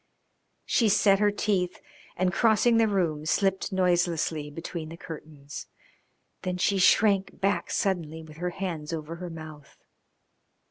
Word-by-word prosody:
She 225 -3 +3
set 200 -1 +4
her 210 0 +4
teeth 195 -3 -1 0.4
and, 180 0 +1
crossing 230 +2 +4
the 225 -1 +4
room, 170 -7 0
slipped 190 +3 +1
noiselessly 175 -4 +1
between 160 +1 -6
the 165 - -9
curtains. 150 -4 -9 0.7
Then 180 0 -2
she 195 +2 +2
shrank 195 0 +3
back 195 +2 0
suddenly 160 -5 -1
with 155 -1 -13
her 180 +1 -2
hands 170 -4 -4
over 160 +1 -5
her 180 0 -6
mouth. 155 -3 -10
180 Hz, 135 wpm, -27 LUFS, 160-195 Hz, 0.7 s, set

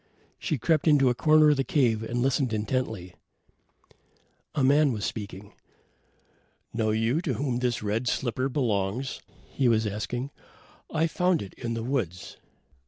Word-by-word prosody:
So - - -38 0.2
she 155 - -1
crept 155 +5 +1
into 140 -4 +5
a - - +1
corner 155 +3 +5
of 145 - +1
the 135 - +1
cave 120 -7 +2
and 120 +2 -2
listened 130 -2 +1
intently. 110 -4 -2 1.4
A 140 - +1
man 145 +2 +4
was 105 -4 -3
speaking. 100 -2 -6 1.2
"Know 110 -1 0
you 115 +8 +1
to 150 -8 -2
whom 130 -3 -1
this 120 -3 -1
red 110 +4 -1
slipper 130 +2 -1
belongs?" 120 -1 -1 0.3
he 135 - +1
was 110 -2 +3
asking. 120 +6 -3 0.6
"I 160 +1 +2
found 180 - +1
it 95 - -11
in 115 -2 -4
the 115 - -3
woods." 115 - -3
125 Hz, 155 wpm, -27 LUFS, 110-140 Hz, 1.4 s, into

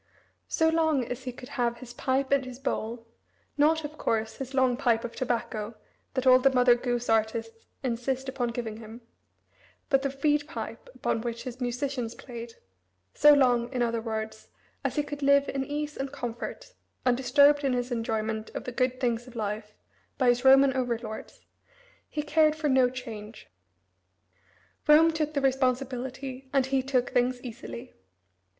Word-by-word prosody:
So 320 - +2
long 315 -5 +2
as 250 +2 -6
he 250 - -3
could 250 +1 -11
have 235 -1 -1
"his 240 0 -10
pipe 265 +1 0
and 280 -1 +3
his 255 -1 -8
bowl" 235 -3 -3 0.5
not, 310 +2 +3
of 305 +1 -7
course, 220 0 -1
his 270 0 -6
long 260 -2 +3
pipe 240 -3 +1
of 235 - -6
tobacco 230 -3 -2 0.4
that 260 -1 0
all 255 0 +8
the 270 +1 +5
Mother 250 -2 +5
Goose 245 0 -2
artists 225 +1 -1 0.2
insist 255 +2 -2
upon 260 -2 -1
giving 230 -2 -4
him 225 +1 -10 0.9
but 270 -2 +4
the 275 - 0
reed 295 -1 +3
pipe 330 +8 -7
upon 225 - -1
which 235 0 -4
his 255 0 -7
musicians 245 -1 -2
played 235 -2 -9 0.6
so 295 - +7
long, 245 -3 +3
in 250 -2 0
other 230 -1 0
words, 220 -1 -5 0.4
as - - -1
he 295 - +1
could 290 0 -7
live 280 0 +4
in 270 -1 -1
ease 295 +2 -4
and 270 0 -4
comfort, 245 - -6 0.3
undisturbed 280 +4 +4
in 270 -2 +2
his 245 0 -2
enjoyment 220 -1 -2
of - - -4
the 250 - -5
good 255 +1 0
things 240 -1 -1
of 250 - -13
life 210 -1 -4 0.4
by 255 -3 +3
his 245 +1 +2
Roman 270 0 +7
over 245 -3 0
lords, 220 -2 -8 0.7
he 300 - -3
cared 310 0 +3
for 310 -1 -1
no 260 -2 +4
change. 220 - -9 1.4
Rome 315 +2 +7
took 305 -1 -2
the 280 - +1
responsibility 260 0 -1
and 270 -2 +3
he 265 0 +1
took 255 -2 0
things 245 0 +1
easily. 245 0 -8
255 Hz, 170 wpm, -28 LUFS, 235-275 Hz, 1.4 s, all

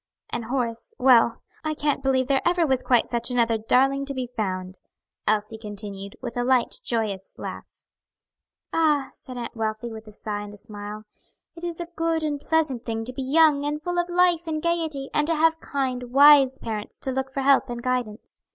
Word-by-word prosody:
And 235 -1 -3
Horace 235 -2 -3
well, 245 -3 +4 0.2
I 310 0 -1
can't 290 -2 0
believe 260 -1 +1
there 270 -1 +2
ever 345 -1 +3
was 265 -3 +1
quite 245 -3 +3
such 235 0 -1
another 230 -2 +2
darling 270 +5 +2
to 275 0 -4
be 250 -2 -4
found," 185 -3 -3 0.5
Elsie 215 +1 0
continued, 200 -2 -6
with 240 -2 -5
a 245 - 0
light, 250 -1 +2
joyous 215 -5 -3
laugh. - - -8 0.9
"Ah!" 300 -4 +2
said 255 -1 -9
Aunt 240 0 -6
Wealthy 220 +1 -3
with 220 0 -9
a - - -10
sigh 210 0 -4
and 205 0 -8
a - - -14
smile, 210 0 -8 0.5
"it 335 - -11
is 345 -1 -4
a 345 - -3
good 330 -1 0
and 295 -2 -1
pleasant 300 -6 0
thing 225 -1 -3
to 255 - -5
be 270 - -4
young 290 +1 +4
and 295 +1 -1
full 350 +3 -2
of 350 0 -1
life 350 -1 +3
and 310 -1 -1
gayety, 320 -4 -2
and 300 0 +2
to 330 - +2
have 325 +1 +3
kind, 255 -4 -3
wise 275 -1 +7
parents 215 -4 -5
to 265 - -2
look 265 +1 -1
to 265 - -23
for 275 - -1
help 270 -1 +4
and 240 0 -5
guidance. 245 -4 -3
255 Hz, 200 wpm, -25 LUFS, 225-295 Hz, 0.9 s, wise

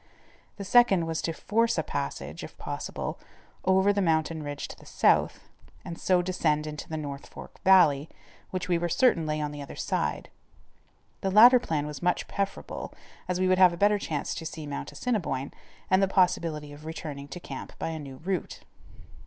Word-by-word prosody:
The 200 - -5
second 195 -6 +5
was 165 -1 -2
to 165 - -1
force 230 +7 +1
a - - +1
passage, - - -4
if - - -10
possible, - - -5 0.5
over 190 +2 +4
the 200 - 0
mountain 160 -2 +1
ridge 145 -1 -5
to - - -8
the - - -16
south - - +2 0.4
and 170 - -5
so 180 +1 +2
descend 155 -4 0
into 150 -1 -7
the 160 - -3
North 140 -2 -6
Fork - - -12
valley, 160 -6 +5 0.4
which 185 -1 -3
we 175 -2 +2
were 175 0 -1
certain 170 -3 +3
lay 155 0 -1
on 150 -1 -2
the 145 0 -7
other 140 - -8
side. - - -2 0.9
The 195 - 0
latter 240 +6 +8
plan 155 -8 -2
was 150 -2 -7
much 180 0 0
preferable, 200 0 -4 0.4
as 180 0 -1
we 185 - +2
would 185 0 +3
have 180 -2 +7
a - - -6
better 205 +2 +3
chance 150 -6 -3
to - - -6
see 155 -1 -7
Mount 145 -1 -5
Assiniboine, 170 - -2 0.3
and 185 +1 +3
the 195 - +4
possibility 170 -6 +1
of 145 +1 -12
returning 150 -3 -6
to 145 +5 -8
camp - - -8
by - - -3
a 160 -1 -4
new 140 -3 -8
route. 180 +2 -3
170 Hz, 190 wpm, -28 LUFS, 150-190 Hz, 0.9 s, latter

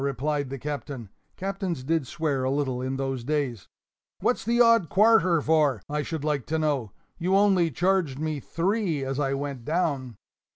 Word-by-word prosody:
replied 140 +1 -1
the 135 - -5
Captain 140 -4 -5 0.3
(captains 190 -6 -3
did 160 -1 0
swear 150 -5 -1
a 130 - +1
little 135 -3 -1
in 130 +1 -2
those 135 -2 -3
days); 135 -6 -2 0.5
"what's - - 0
the 235 +2 +1
odd 230 -8 +5
quarter 195 -5 +5
for, 150 -6 +3
I 150 +1 -1
should 160 -1 -4
like 150 -4 -1
to 160 - 0
know? 145 -9 0 0.3
You 185 +3 +1
only 195 -4 +4
charged 175 -2 +1
me 155 0 -2
three 170 - -1
as 135 +1 -3
I 135 -1 0
went 140 -3 -4
down." 140 -6 -1
150 Hz, 170 wpm, -26 LUFS, 135-170 Hz, 0.5 s, odd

